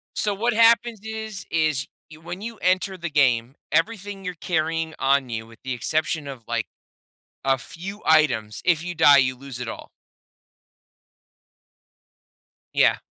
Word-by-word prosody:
So, 205 -1 0
what 230 +4 0
happens 230 0 +4
is, 220 -2 -6
is 155 -5 +1 0.2
you 155 0 -14
when 175 +3 -7
you 230 +1 -6
enter 185 +1 +1
the 170 -2 -4
game, 130 -3 +2 0.2
everything 205 -3 -1
you're 180 -1 -4
carrying 165 -1 -1
on 135 -1 +2
you, 110 -1 -4
with 115 0 -16
the 130 -1 -3
exception 155 +4 -1
of, 130 -4 -8
like, - - -1 0.8
a 135 0 +3
few 190 - -8
items 125 -10 +3
if 170 -2 +3
you 175 -1 -5
die, 145 -2 +7
you 130 -1 +3
lose 135 -2 -8
it 125 - -4
all. - - -8 2.8
Yeah. - - +4
160 Hz, 145 wpm, -24 LUFS, 135-195 Hz, 2.8 s, die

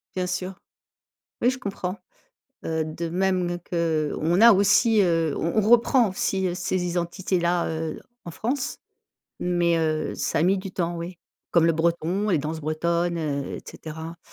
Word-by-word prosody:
Bien 185 -1 -1
sûr. 185 +1 -3 0.9
Oui, 245 - +4
je 260 - -6
comprends, 195 -4 -4 0.7
heu, 160 -1 -1
de 165 +2 -4
même 180 0 0
qu'on 165 0 0
a 230 +1 +9
aussi, 205 +3 +4
heu, 165 -5 +1
on 165 +6 -1
on 210 - 0
reprend 240 0 +5
aussi, 190 0 -1
heu, 175 - -2
ces 180 0 -1
identités-là, 175 0 0
heu, 160 0 -3 0.2
en 170 - -7
France, 250 - -2 0.6
mais 175 -1 +1
heu, 155 -1 0
ça - - -1
a - - +3
mis 190 +3 +3
du 190 0 -6
temps, 175 -2 -2
oui. 170 +1 -6 0.3
Comme 170 -2 +4
le 165 - +4
Breton, 170 +5 0
les 175 - +3
danses 155 +2 -3
bretonnes, 170 +3 0
heu, 145 -4 -3
et - - -8
cetera 160 +1 -8
175 Hz, 165 wpm, -25 LUFS, 165-190 Hz, 0.9 s, a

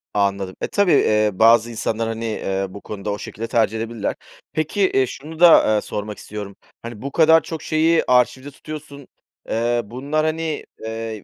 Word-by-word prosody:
Anladım. 100 -2 0
E, - - -1
tabii, 200 -3 +2
eee, 105 0 +3
bazı 115 +3 +4
insanlar, 115 0 -2
hani, 115 0 -4
eee, 95 -3 -2
bu 100 +2 -10
konuda 105 0 -5
o 100 - -3
şekilde 115 +2 -6
tercih 115 -1 +1
edebilirler. 115 -1 -3 0.4
Peki, 155 +6 -1
eee, 135 - +3
şunu 155 +6 -9
da, 165 -10 +7
eee, 105 - +1
sormak 105 0 -5
istiyorum. 100 -1 -8 0.3
Hani, 115 -2 -8
bu 140 - -5
kadar 160 +1 +5
çok 160 -2 -6
şeyi 160 +1 +2
arşivde 125 +2 +2
tutuyorsun, 145 -1 -10 0.4
eee, 120 +1 +1
bunlar, 140 +8 -2
hani, 160 +1 -1 0.4
eee, 110 -1 -5
115 Hz, 170 wpm, -21 LUFS, 105-150 Hz, 0.4 s, da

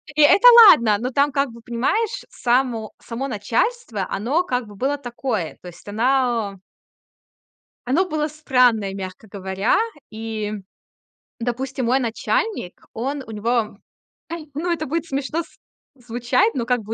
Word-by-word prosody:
И 300 - +3
это 405 +11 +7 0.2
ладно, 220 - +5
но 250 +3 -3
там, 285 +3 +2
как 275 -1 0
бы, 230 0 -13
понимаешь, 260 - -1
само 240 -3 0
само 245 +4 -5
начальство, 230 - -1
оно, 260 - 0
как 250 -8 -2
бы, 205 - -12
было 275 +7 -1
такое, 240 - -4
то - - -11
есть 175 +3 -13
она 230 -3 0 1.3
Оно 330 +9 +2
было 305 -1 -1
странное, 250 -9 +2
мягко 190 +2 -8
говоря. 190 +1 0 0.3
И, 220 -1 -4 0.9
допустим, 255 +1 -3
мой 260 +3 +3
начальник, 235 - -2
он 270 +5 -3
у - - -11
него, 220 0 -1 0.6
ай, 330 -2 -6
ну, 345 +5 -2
это 315 -2 -1
будет 330 +4 -2
смешно 290 +2 -2
с - - -22 0.5
звучать, 245 - +1
но, 240 - -1
как 250 0 +1
бы, 220 - -5
245 Hz, 145 wpm, -22 LUFS, 220-285 Hz, 1.3 s, это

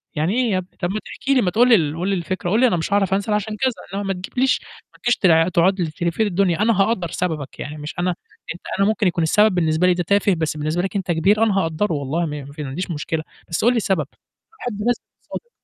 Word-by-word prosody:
يعني 160 +5 0
إيه 250 -4 +1
يابني! 185 -1 -3
طَب 175 - 0
ما 215 - -2
تحكي 275 - -2
لي 255 - +4
ما 180 -3 +1
تقول 245 +3 +4
لي 235 - +8
ال 155 -5 0
قُل 185 - -1
لي 195 - +1
الفكرة، 175 0 -3
قُل 215 +5 +2
لي 255 - +6
أنا 180 - +1
مش 165 +5 -2
هاعرف 195 -2 +2
أنزل 200 +2 0
عشان 210 +1 -1
كذا، 260 -1 +2 0.2
إنما 200 +1 -2
ما 195 - +1
تجيبليش 250 +8 0 0.3
ما - - -21
تجيش 240 0 +3
تلا 165 -3 +4
تقعد 185 +2 +2
لي 160 -2 -1
تِلِفّ 170 +4 -3
لي 220 - +3
الدنيا، 185 -1 +1
أنا 215 -2 +3
هأقدَّر 195 -6 +1
سببك 155 -6 -3
يعني 150 +1 -6
مش 150 +1 -7
أنا 180 +1 +1 0.5
أنت - - -14 0.2
أنا 195 - +4
ممكن 215 -2 +2
يكون 170 -2 0
السبب 210 +4 +4
بالنسبة 165 +1 +2
لي 180 - +5
ده 175 0 -1
تافه 200 +2 +2
بس 160 -1 -2
بالنسبة 155 +4 -1
لك 195 +2 -4
أنت 190 -3 -1
كبير، 195 +7 +3
أنا 210 -3 +2
هاقدَّره 165 +3 0
والله 150 +4 -1
م - - -4
ما 140 -2 -6 0.2
عنديش 175 +7 -4
مشكلة، 155 +1 -3 0.3
بس 165 - -1
قُل 240 - +6
لي - - 0
السبب، 190 - 0 0.4
باحب 245 - -6
بس 245 - +4
تكون - - -10
صادق. 475 - -39
185 Hz, 260 wpm, -21 LUFS, 165-210 Hz, 0.5 s, لي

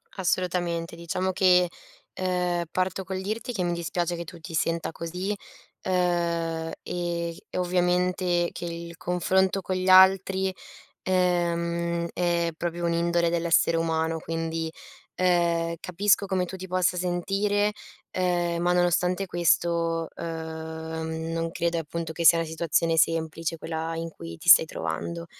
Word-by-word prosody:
Assolutamente, 175 -2 -1
diciamo 175 +3 -2
che, 180 -2 +4 0.5
uhm, 180 -2 0
parto 185 +1 -1
col 190 0 -4
dirti 220 +5 -3
che 185 -4 -1
mi 175 - 0
dispiace 170 0 -2
che 170 - -5
tu 170 +1 -11
ti 165 +1 -9
senta 165 +1 0
così, 180 +5 -3 0.5
uhm, 170 -3 0
e 170 -1 -3
e - - -5
ovviamente 180 0 +1
che 175 - -6
il 170 0 -6
confronto 190 +2 +1
con 185 0 -2
gli 185 0 -2
altri, 190 0 +5 0.5
ehm, 170 -2 0
è 170 -1 +1
proprio 170 +1 -3
un'indole 170 0 +2
dell'essere 170 0 +2
umano. 160 0 0
Quindi, 165 0 -3 0.4
ehm, 170 -2 +2
capisco 200 +3 +2
come 185 -1 0
tu 190 - -7
ti 185 0 -7
possa 180 0 +1
sentire, 195 +4 0 0.4
ehm, 175 -2 0
ma 175 0 +2
nonostante 180 +2 +2
questo, 170 -1 +1
uhm, 160 0 -5
non 165 0 -2
credo 170 0 -1
e - - +1
appunto, 165 +1 -5
che 170 +1 -3
sia 170 - +8
la 165 - 0
situazione 165 +1 +1
semplice 165 +1 0
quella 160 0 -4
in 165 0 -4
cui 85 - -9
ti - - -12
stai - - +9
trovando. 85 +1 -4
170 Hz, 140 wpm, -26 LUFS, 165-180 Hz, 0.5 s, stai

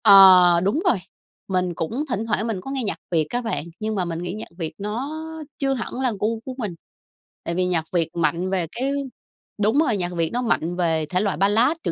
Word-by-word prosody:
Ờ, 185 -4 +8
đúng 205 +11 +1
rồi, 360 - +4 0.5
mình 185 -2 0
cũng 220 - -2
thỉnh 220 -2 -1
thoảng 220 0 0
mình 210 -5 -2
có 270 - -7
nghe 270 -2 -1
nhạc 200 -7 -2
Việt 160 -3 +2
á 245 - -1
bạn, 225 -9 -2
nhưng 215 0 -2
mà 185 -3 0
mình 165 -1 -3
nghĩ 175 +1 -4
nhạc 215 - -6
Việt 160 -3 -4
nó 215 +7 -3 0.5
chưa 270 -1 +1
hẳn 245 -3 -4
là 255 -2 +2
gu 220 +2 0
của 260 - -5
mình. 210 -9 -4 0.7
Tại 170 - -3
vì 185 +1 +1
nhạc 175 -3 0
Việt 165 -2 +2
mạnh 170 +2 0
về 185 -3 0
cái 265 +3 -1 0.7
đúng 220 +7 +3
rồi, 255 -10 +2
nhạc 180 -2 -2
Việt 165 -1 +1
nó 245 - 0
mạnh 175 -8 0
về 165 -3 +1
thể 185 0 +1
loại 200 -6 0
Ballad, 220 - +3
trữ - - 0
195 Hz, 225 wpm, -23 LUFS, 175-230 Hz, 0.7 s, Ờ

